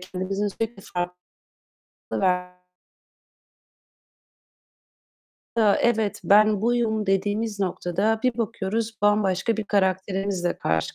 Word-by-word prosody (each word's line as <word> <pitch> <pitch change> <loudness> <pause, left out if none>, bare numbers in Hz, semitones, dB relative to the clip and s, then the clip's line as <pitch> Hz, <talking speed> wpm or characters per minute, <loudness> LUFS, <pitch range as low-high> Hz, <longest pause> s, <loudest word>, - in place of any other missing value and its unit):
kendimizin 190 +2 -3
sürekli 225 0 -5
farklı 175 0 -3 1.1
ver 180 -1 0 3.0
Ya, 210 -3 +5
"Evet, 220 -3 +1
ben 210 0 +5
buyum." 225 -2 +1
dediğimiz 205 +2 0
noktada 195 +4 0
bir 250 -2 0
bakıyoruz, 225 0 -2
bambaşka 205 +1 +2
bir 220 - -3
karakterimizle 190 -2 0
karşı 80 0 -1
205 Hz, 90 wpm, -24 LUFS, 190-220 Hz, 3.0 s, Ya